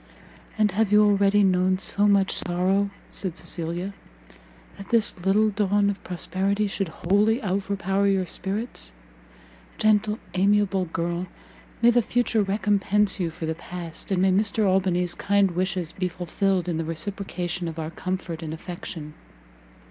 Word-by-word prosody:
"And 210 -2 +3
have 205 +2 +1
you 210 0 +6
already 200 0 +4
known 185 0 +3
so 205 +2 +2
much 200 -1 +3
sorrow," 185 +3 +1 0.2
said 185 -3 -3
Cecilia, 175 +3 -4 0.8
"that 195 - -11
this 230 -2 +3
little 210 +3 +3
dawn 205 0 +2
of 200 - -9
prosperity 190 +3 -1
should 195 -1 -2
wholly 205 +8 +1
overpower 195 0 0
your 195 -2 +2
spirits? 195 - -3 0.8
Gentle, 215 0 +2 0.2
amiable 195 0 +2
girl! 170 +2 -3 0.6
may 240 - +7
the 240 0 +4
future 235 -1 +1
recompense 205 0 +1
you 175 -3 0
for 160 0 -6
the 160 - -1
past, 170 0 -6
and 190 -2 +1
may 190 - +4
Mr 210 +2 +2
Albany's 180 -2 +2
kind 200 -1 +2
wishes 180 -1 -2
be 185 -1 -2
fulfilled 180 +1 -1
in 170 -2 -1
the 165 - -1
reciprocation 175 +1 -3
of 165 0 -6
our 160 0 -4
comfort 185 -2 -4
and 160 -1 -5
affection!" 160 -2 -7
190 Hz, 145 wpm, -25 LUFS, 175-205 Hz, 0.8 s, may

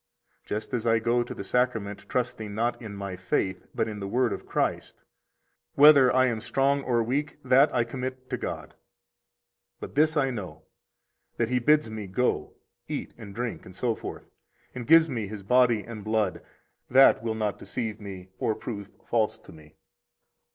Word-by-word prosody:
Just 105 +4 -5
as 120 -1 -1
I 115 0 +4
go 120 +2 +1
to 120 - -5
the - - -6
Sacrament 105 -3 -1
trusting 110 -4 -2
not 120 +3 -1
in 105 -3 -7
my 100 -2 -5
faith, 95 0 -2
but 110 - 0
in 105 -1 -5
the 100 - -4
Word 125 +3 +1
of - - -8
Christ; - - -2 0.7
whether 140 -3 +8
I 130 0 +4
am 115 -4 -1
strong 140 +3 +1
or 120 -3 +1
weak, 140 +6 -2
that 135 +4 +5
I 120 - +2
commit 130 +2 -6
to - - 0
God. - - -5 1.1
But - - -8
this 155 +2 +3
I 135 -2 +2
know, 90 -9 -7 0.7
that 115 -1 0
He 125 0 +2
bids 150 +1 +3
me 110 -2 -6
go, 125 +7 -1 0.3
eat - - -5
and 100 -2 -11
drink, 120 0 -4
etc., 110 +5 -4 0.5
and 125 -2 -6
gives 165 +1 +7
me 115 -8 -3
His 100 -1 -8
body 120 0 +3
and 110 -3 -8
blood; 110 -3 0 0.5
that 135 -2 +6
will 115 -1 -2
not 105 -2 -2
deceive 110 -3 -4
me 95 -2 -8
or 110 - 0
prove 100 -4 -6 0.2
false 110 -1 +1
to - - -16
me. 75 -1 -16
115 Hz, 170 wpm, -27 LUFS, 105-125 Hz, 1.1 s, whether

